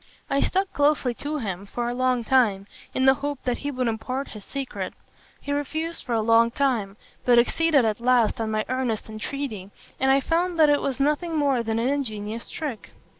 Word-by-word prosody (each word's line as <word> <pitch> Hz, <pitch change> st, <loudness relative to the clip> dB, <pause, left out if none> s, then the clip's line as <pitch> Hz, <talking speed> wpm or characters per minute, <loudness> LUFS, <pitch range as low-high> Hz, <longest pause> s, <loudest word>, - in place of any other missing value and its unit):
I 275 Hz, -, +2 dB
stuck 385 Hz, +1 st, 0 dB
closely 290 Hz, -4 st, +2 dB
to 295 Hz, +5 st, -4 dB
him 200 Hz, -6 st, -4 dB
for 240 Hz, +3 st, -3 dB
a 240 Hz, -, -1 dB
long 255 Hz, -1 st, +1 dB
time, 220 Hz, -6 st, +3 dB, 0.3 s
in 260 Hz, -, 0 dB
the 265 Hz, -, +7 dB
hope 285 Hz, -1 st, -3 dB
that 245 Hz, -1 st, -1 dB
he 285 Hz, -, -3 dB
would 255 Hz, -3 st, -1 dB
impart 255 Hz, +5 st, -3 dB
his 210 Hz, -2 st, -10 dB
secret. 275 Hz, +2 st, -5 dB, 0.4 s
He 285 Hz, -, -6 dB
refused 315 Hz, +4 st, -3 dB
for 240 Hz, -, -2 dB
a 225 Hz, -, +2 dB
long 230 Hz, +1 st, +5 dB
time, 235 Hz, -7 st, 0 dB, 0.3 s
but 245 Hz, -1 st, +5 dB
acceded 285 Hz, +2 st, +3 dB
at 215 Hz, -1 st, 0 dB
last 240 Hz, -2 st, +3 dB
on 220 Hz, -, -1 dB
my 215 Hz, 0 st, -1 dB
earnest 245 Hz, -4 st, -2 dB
entreaty, 215 Hz, -3 st, -5 dB, 0.3 s
and 265 Hz, -, +2 dB
I 270 Hz, +1 st, +5 dB
found 340 Hz, +4 st, 0 dB
that 305 Hz, -2 st, +6 dB
it 290 Hz, -, +3 dB
was 270 Hz, -1 st, -2 dB
nothing 300 Hz, +4 st, +1 dB
more 280 Hz, -4 st, +2 dB
than 225 Hz, -1 st, -2 dB
an 230 Hz, +2 st, +1 dB
ingenious 225 Hz, -5 st, -3 dB
trick. 280 Hz, -9 st, -6 dB
255 Hz, 200 wpm, -25 LUFS, 225-285 Hz, 0.4 s, the